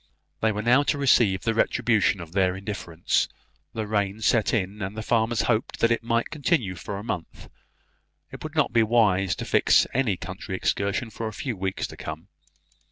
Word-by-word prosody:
They 110 - +3
were 105 0 -3
now 125 +5 +5
to 145 - 0
receive 115 -9 +3
the 115 - +1
retribution 110 -3 +2
of 80 -2 -10
their 90 0 +1
indifference; 95 -4 -1 0.5
rain 105 -2 -1
had 110 - -10
set 110 -1 +3
in, 105 -1 -2
and 95 +3 -4
the 110 - -3
farmers 115 0 +1
hoped 115 0 0
that 115 - +3
it 115 - +1
might 115 0 -1
continue 140 - 0
for 95 +3 -6
a 100 - -7
month. 90 -7 -6 0.8
It - - -9
would - - -7
not - - +2
be 115 - +5
wise 105 -5 +3
to - - -5
fix - - +4
any 115 -7 +1
country 95 +1 -6
excursion 100 +4 -1
for 115 - -4
a 110 - -6
few 120 +2 -4
weeks 95 0 -3
to - - -9
come. 80 +5 -7
105 Hz, 190 wpm, -25 LUFS, 95-115 Hz, 0.8 s, now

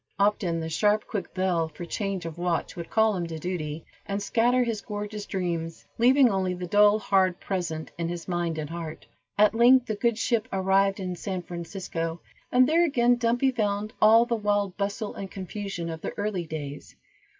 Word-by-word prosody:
Often 200 -5 +1
the 160 - -3
sharp 210 +6 +2
quick 205 -4 -4
bell, 180 -3 +1
for 160 +2 -8
change 195 0 -3
of 165 0 -6
watch, 175 -1 -1
would 170 -1 -7
call 220 -1 +3
him 175 -2 -2
to 165 -1 -6
duty, 160 -2 -4 0.2
and 200 0 -2
scatter 240 +4 +2
his 230 -3 -2
gorgeous 210 0 -5
dreams, 170 -3 -3
leaving 260 +3 +6
only 190 -4 0
the 180 0 -5
dull, 205 +3 +5
hard 190 -3 +2
present 170 -5 -3
in 170 0 -1
his 175 -1 -6
mind 175 -2 -1
and 155 0 -4
heart. 165 -2 -6 0.3
At 210 +1 +5
length 245 +2 +6
the 220 - -2
good 235 +1 0
ship 230 0 0
arrived 195 +1 +2
in 185 -2 -3
San 185 0 -4
Francisco, 170 -1 -5 0.3
and 250 0 +5
there 330 +3 +4
again 245 -6 +3
Dumpy 245 +3 +2
found 210 -2 -1
all 225 +2 +7
the 240 - -2
wild 205 -3 0
bustle 205 +2 -3
and 195 - -6
confusion 195 -2 -5
of 160 -1 -6
the - - -5
early 205 -5 -2
days. 145 -2 -7
195 Hz, 185 wpm, -26 LUFS, 170-215 Hz, 0.3 s, all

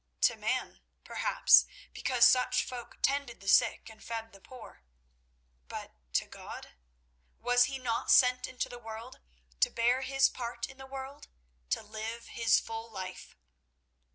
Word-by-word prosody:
To - - +4
man, - - -2 0.2
perhaps, 65 0 +4 0.3
because 250 -2 +3
such 250 0 +3
folk 245 -2 -8
tended 275 -3 0
the 195 - -13
sick - - +4
and 220 -1 -13
fed 225 -1 -6
the 195 - -16
poor. 250 - -13 0.9
But - - -7 0.2
to - - +2
God? - - -10 0.7
Was 245 0 +4
he 270 - -4
not 240 -3 -2
sent 250 0 +5
into 260 -1 -3
the 245 - -10
world 225 +2 -9 0.4
to - - +4
bear 240 +3 +2
his 270 0 +3
part 235 -1 -5
in 270 0 -15
the 265 - -10
world—to 220 - -7
live 220 +2 -7
his 230 -1 +3
full 225 0 -7
life? 185 -3 -8
235 Hz, 145 wpm, -31 LUFS, 220-255 Hz, 0.9 s, sent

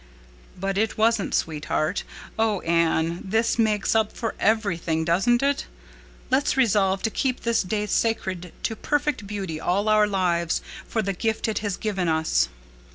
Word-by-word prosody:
"But 195 +1 -1
it 220 +1 0
wasn't, 225 -1 +2
sweetheart. 155 +2 -1 0.4
Oh, 220 -4 +1
Anne, 165 0 +1
this 225 +4 0
makes 215 -3 +2
up 220 -1 +2
for 230 -2 -3
everything, 170 -7 +1
doesn't 230 +10 +2
it? 280 0 0 0.6
Let's 270 +1 +2
resolve 195 -6 +2
to 225 - 0
keep 255 +1 -1
this 235 -1 +1
day 210 +2 -1
sacred 190 -5 -1
to 225 - -1
perfect 290 -5 -1
beauty 190 -6 -4
all 200 +5 0
our 215 -1 +5
lives 175 -4 0 0.2
for 220 - -1
the 195 0 -1
gift 220 +5 -1
it 220 - -1
has 205 -3 -3
given 195 -5 -1
us." 160 - +2
205 Hz, 155 wpm, -24 LUFS, 175-225 Hz, 0.6 s, our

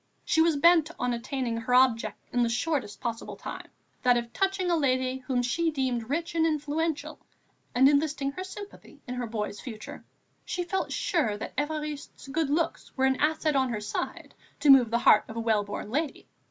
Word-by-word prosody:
She 320 - +3
was 330 -1 +4
bent 330 +1 +5
on 250 0 0
attaining 235 0 -2
her 230 +2 0
object 230 -5 +3 0.2
in 245 - +2
the 235 - +2
shortest 255 -3 -1
possible 230 -1 -4
time, - - -7 0.3
that 245 -1 +4
of 235 0 -4
touching 385 -2 0
a - - +4
lady 260 -3 +1
whom 255 -1 -1
she 325 +7 +1
deemed 255 -6 -2
rich 325 +4 -2
and 330 -1 +2
influential, 310 0 -1 0.6
and 260 +2 +6
enlisting 285 -1 +1
her 370 +7 -6
sympathy 390 -5 -10
in 250 - -5
her 250 -1 -3
boy's 210 -2 -4
future. 220 -4 -8 0.4
She 355 - -3
felt 380 +2 -2
sure 305 - 0
that - - -7
Évariste's 295 -1 -4
good 310 0 0
looks 325 +3 -1
were 265 - +3
an 265 0 +2
asset 310 0 +1
on 260 -1 +2
her 225 -3 -2
side 210 +1 -5 0.3
to 290 - +7
move 255 -4 +7
the 230 - +2
heart 215 -2 +5
of 225 - -9
a - - -2
well 220 -2 +2
born 205 +1 -6
lady. 295 +2 -2
270 Hz, 195 wpm, -28 LUFS, 240-315 Hz, 0.6 s, to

